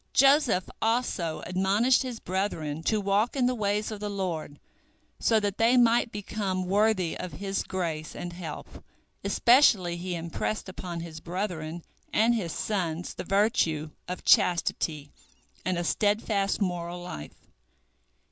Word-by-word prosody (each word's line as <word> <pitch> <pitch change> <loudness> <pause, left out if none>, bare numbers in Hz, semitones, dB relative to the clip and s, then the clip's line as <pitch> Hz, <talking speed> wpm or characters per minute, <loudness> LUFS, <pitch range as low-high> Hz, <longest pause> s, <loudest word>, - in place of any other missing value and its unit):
Joseph 270 -8 +4
also 225 -8 0
admonished 195 +7 +3
his 250 -4 -4
brethren 165 -5 -2
to 215 - +2
walk 205 +5 +1
in 260 -3 +2
the 250 - +2
ways 210 -1 -1
of 215 - -5
the 210 0 -3
Lord, 175 -7 -4 0.6
so 225 -1 +3
that 205 -1 -2
they 235 +3 +5
might 235 -1 +4
become 195 -2 -3
worthy 195 -2 +2
of 180 - -6
His 195 0 -2
grace 165 -5 -4
and 175 0 -6
help. 170 -4 -8 0.4
Especially 200 -4 +4
he 180 0 -4
impressed 170 +6 -3
upon 180 -2 -6
his 165 -1 -8
brethren 170 -2 -4 0.3
and 225 +2 +4
his 190 -8 -2
sons 175 -5 -2
the - - -6
virtue 180 -7 +1 0.2
of 180 - -6
chastity 155 -4 +2 0.5
and 185 -1 0
a 175 - -1
steadfast 205 +1 +1
moral 175 -3 -2
life. 125 - -9
190 Hz, 140 wpm, -28 LUFS, 170-215 Hz, 0.6 s, they